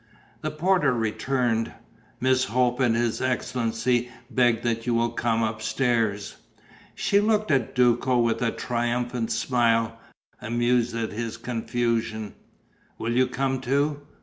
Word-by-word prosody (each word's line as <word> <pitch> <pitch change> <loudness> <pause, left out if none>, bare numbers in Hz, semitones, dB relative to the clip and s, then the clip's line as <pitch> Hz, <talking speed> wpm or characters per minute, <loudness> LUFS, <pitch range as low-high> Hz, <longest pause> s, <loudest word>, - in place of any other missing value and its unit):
The 155 - -2
porter 155 -3 +2
returned: 115 0 0 0.5
"Miss 130 +1 +2
Hope 125 0 +1
and 120 -3 +3
his 115 -1 0
excellency 125 -1 0 0.2
beg 120 -3 +2
that 115 0 -1
you 120 - +2
will 115 0 +1
come 115 -1 0
upstairs." 110 -1 -1 0.6
She 200 - +2
looked 215 -1 +1
at 130 -5 +1
Duco 125 +1 +3
with 115 -2 +1
a 125 - +2
triumphant 120 0 -2
smile, 115 -2 +1 0.4
amused 120 +1 +1
at 115 -1 -2
his 115 +1 -4
confusion: 115 -2 -2 0.6
"Will 115 +1 -2
you 130 +1 +4
come 130 +1 -1
too?" 140 +3 0
120 Hz, 125 wpm, -25 LUFS, 115-130 Hz, 0.6 s, you